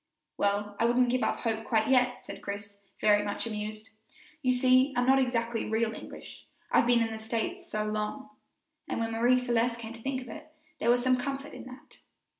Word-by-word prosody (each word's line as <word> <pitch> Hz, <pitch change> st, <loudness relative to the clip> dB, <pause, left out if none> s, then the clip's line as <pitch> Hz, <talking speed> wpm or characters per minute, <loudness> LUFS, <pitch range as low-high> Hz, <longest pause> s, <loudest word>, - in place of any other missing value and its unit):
"Well, 205 Hz, 0 st, 0 dB
I -, -, +3 dB
wouldn't 245 Hz, +1 st, +3 dB
give 255 Hz, 0 st, +1 dB
up -, -, 0 dB
hope 225 Hz, -1 st, -1 dB
quite 220 Hz, -1 st, +1 dB
yet," 250 Hz, -1 st, +2 dB
said -, -, -8 dB
Chris, 200 Hz, 0 st, -7 dB, 0.2 s
very 205 Hz, -1 st, +4 dB
much 205 Hz, +2 st, -2 dB
amused; 215 Hz, 0 st, -5 dB, 0.5 s
"you 255 Hz, -3 st, +2 dB
see, 255 Hz, +2 st, +4 dB
I'm 245 Hz, -, +3 dB
not 265 Hz, +1 st, +5 dB
exactly 235 Hz, -3 st, 0 dB
real 220 Hz, 0 st, +1 dB
English, -, -, -10 dB, 0.2 s
I've -, -, +4 dB
been 240 Hz, -1 st, +4 dB
in 225 Hz, -, -2 dB
the 220 Hz, -, -5 dB
States 245 Hz, -, -3 dB
so 215 Hz, 0 st, -2 dB
long;" 215 Hz, +6 st, -3 dB, 0.6 s
and -, -, -2 dB
when 225 Hz, 0 st, -1 dB
Marie 240 Hz, +3 st, +3 dB
Celeste 240 Hz, -1 st, +1 dB
came 230 Hz, -1 st, -7 dB
to 230 Hz, -, -12 dB
think 270 Hz, +1 st, -2 dB
of 255 Hz, -, -10 dB
it, 240 Hz, -, -9 dB, 0.3 s
there 235 Hz, -, +1 dB
was 245 Hz, 0 st, +4 dB
some 255 Hz, 0 st, +3 dB
comfort 275 Hz, +3 st, -4 dB
in -, -, -9 dB
that. 255 Hz, 0 st, -13 dB
235 Hz, 205 wpm, -29 LUFS, 220-255 Hz, 0.6 s, not